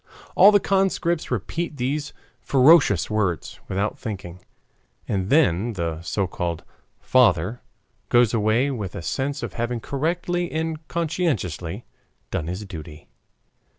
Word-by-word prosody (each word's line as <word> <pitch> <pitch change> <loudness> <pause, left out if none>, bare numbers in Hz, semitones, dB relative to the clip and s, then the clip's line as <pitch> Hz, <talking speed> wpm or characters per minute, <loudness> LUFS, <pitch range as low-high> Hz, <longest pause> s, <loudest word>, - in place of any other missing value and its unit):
All 205 - +8
the 205 - +5
conscripts 190 -4 0
repeat 150 - -3
these 140 +4 -2 0.3
ferocious 135 - +5
words 100 -7 -2
without 100 +2 -2
thinking. 95 -4 -6 0.7
And 95 -1 -1
then 120 - +3
the 85 -4 -3
so 95 +4 -1
called 85 -2 -4 0.4
"father" 115 -3 +3 0.5
goes 120 -2 +4
away 115 +5 +2
with 105 -8 -5
a - - -6
sense 135 +9 -2
of - - -5
having 120 0 -2
correctly 175 +7 -2
and 160 -1 -3
conscientiously 130 - -2 0.5
done 80 - -2
his 90 +4 -4
duty. 80 -4 -10
120 Hz, 120 wpm, -23 LUFS, 95-155 Hz, 0.7 s, All